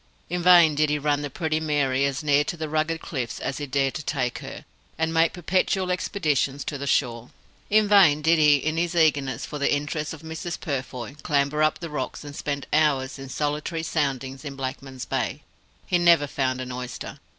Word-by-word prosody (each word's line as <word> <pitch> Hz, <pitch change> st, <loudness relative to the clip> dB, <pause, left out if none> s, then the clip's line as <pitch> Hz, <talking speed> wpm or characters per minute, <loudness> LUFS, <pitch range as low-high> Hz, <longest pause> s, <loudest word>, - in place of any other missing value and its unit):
In 180 Hz, 0 st, -1 dB
vain 175 Hz, -3 st, +7 dB
did 150 Hz, +1 st, +2 dB
he 150 Hz, -, +1 dB
run 145 Hz, 0 st, 0 dB
the 145 Hz, -, -4 dB
Pretty 155 Hz, +2 st, -1 dB
Mary 140 Hz, -4 st, +1 dB
as 140 Hz, +1 st, -2 dB
near 145 Hz, -1 st, +4 dB
to 175 Hz, -, -4 dB
the 160 Hz, -1 st, -3 dB
rugged 155 Hz, +2 st, -1 dB
cliffs 125 Hz, -7 st, -4 dB
as 135 Hz, -, -3 dB
he 145 Hz, -, -4 dB
dared 135 Hz, 0 st, 0 dB
to 155 Hz, -, -5 dB
take 125 Hz, -5 st, -2 dB
her, -, -, -9 dB, 0.3 s
and 160 Hz, 0 st, 0 dB
make 165 Hz, 0 st, +4 dB
perpetual 185 Hz, +1 st, 0 dB
expeditions 150 Hz, -7 st, 0 dB
to 145 Hz, -, -5 dB
the 140 Hz, -, -4 dB
shore. 120 Hz, -3 st, 0 dB, 0.4 s
In 215 Hz, 0 st, +4 dB
vain 175 Hz, -8 st, +5 dB
did 165 Hz, +1 st, +4 dB
he 150 Hz, -1 st, +6 dB
in 155 Hz, +3 st, -1 dB
his 175 Hz, +1 st, 0 dB
eagerness 145 Hz, -6 st, +2 dB
for 150 Hz, -, -6 dB
the 140 Hz, -, +1 dB
interests 150 Hz, +1 st, -2 dB
of 160 Hz, -1 st, -9 dB
Mrs. 160 Hz, +2 st, -5 dB
Purfoy 130 Hz, -2 st, -5 dB
clamber 140 Hz, +1 st, +1 dB
up 155 Hz, 0 st, +3 dB
the 170 Hz, -, -7 dB
rocks, 140 Hz, -1 st, -4 dB
and 145 Hz, -1 st, -9 dB
spend 140 Hz, -2 st, -3 dB
hours 140 Hz, -3 st, +2 dB
in 135 Hz, -1 st, -8 dB
solitary 150 Hz, +4 st, -2 dB
soundings 135 Hz, -4 st, -2 dB
in 140 Hz, -2 st, -6 dB
Blackman's 130 Hz, -1 st, -6 dB
Bay. -, -, -2 dB, 0.4 s
He 175 Hz, -, +1 dB
never 170 Hz, -4 st, +5 dB
found 130 Hz, -2 st, -1 dB
an 130 Hz, 0 st, -6 dB
oyster. 125 Hz, 0 st, -6 dB
150 Hz, 200 wpm, -25 LUFS, 135-160 Hz, 0.4 s, vain